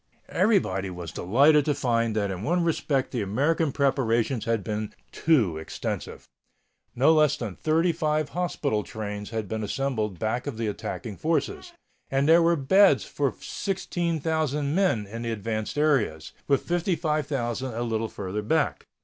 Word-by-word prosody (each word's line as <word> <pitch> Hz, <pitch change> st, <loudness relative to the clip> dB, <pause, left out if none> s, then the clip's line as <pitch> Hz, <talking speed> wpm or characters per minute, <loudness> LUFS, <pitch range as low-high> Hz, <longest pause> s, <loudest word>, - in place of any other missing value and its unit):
Everybody 95 Hz, -, +1 dB
was 90 Hz, -3 st, -7 dB
delighted 140 Hz, -, +4 dB
to 150 Hz, -, +1 dB
find 115 Hz, -5 st, 0 dB
that 100 Hz, -2 st, 0 dB
in 95 Hz, -1 st, -5 dB
one 170 Hz, +9 st, +1 dB
respect 150 Hz, -5 st, 0 dB
the 120 Hz, -, -2 dB
American 145 Hz, -, +1 dB
preparations 130 Hz, -4 st, +1 dB
had 115 Hz, -3 st, 0 dB
been 105 Hz, +1 st, -4 dB, 0.2 s
too 115 Hz, -, +2 dB
extensive. 80 Hz, -, -5 dB, 0.7 s
No 140 Hz, +6 st, +5 dB
less 150 Hz, -1 st, +4 dB
than 110 Hz, -8 st, -5 dB
thirty 165 Hz, +3 st, +2 dB
five 155 Hz, -2 st, 0 dB
hospital 155 Hz, -10 st, -1 dB
trains 105 Hz, -1 st, -6 dB
had 110 Hz, -2 st, -3 dB
been 110 Hz, +2 st, -3 dB
assembled 110 Hz, -4 st, -2 dB
back 110 Hz, +5 st, -2 dB
of -, -, -4 dB
the 115 Hz, -, -2 dB
attacking 105 Hz, +1 st, -5 dB
forces, 160 Hz, -, -1 dB, 0.4 s
and 135 Hz, +1 st, +1 dB
there 165 Hz, +2 st, +7 dB
were 170 Hz, +1 st, +4 dB
beds 165 Hz, +2 st, +4 dB
for 140 Hz, -3 st, -1 dB
16,000 160 Hz, -6 st, -1 dB
men 180 Hz, -, +2 dB
in 115 Hz, +4 st, -7 dB
the 115 Hz, -1 st, -2 dB
advanced 110 Hz, +2 st, -3 dB
areas, 130 Hz, -, +1 dB, 0.2 s
with 140 Hz, -2 st, +2 dB
55,000 150 Hz, -, -1 dB
a 120 Hz, +1 st, -3 dB
little 115 Hz, -1 st, -1 dB
farther 100 Hz, +2 st, -4 dB
back. 105 Hz, -, 0 dB
130 Hz, 150 wpm, -26 LUFS, 110-155 Hz, 0.7 s, there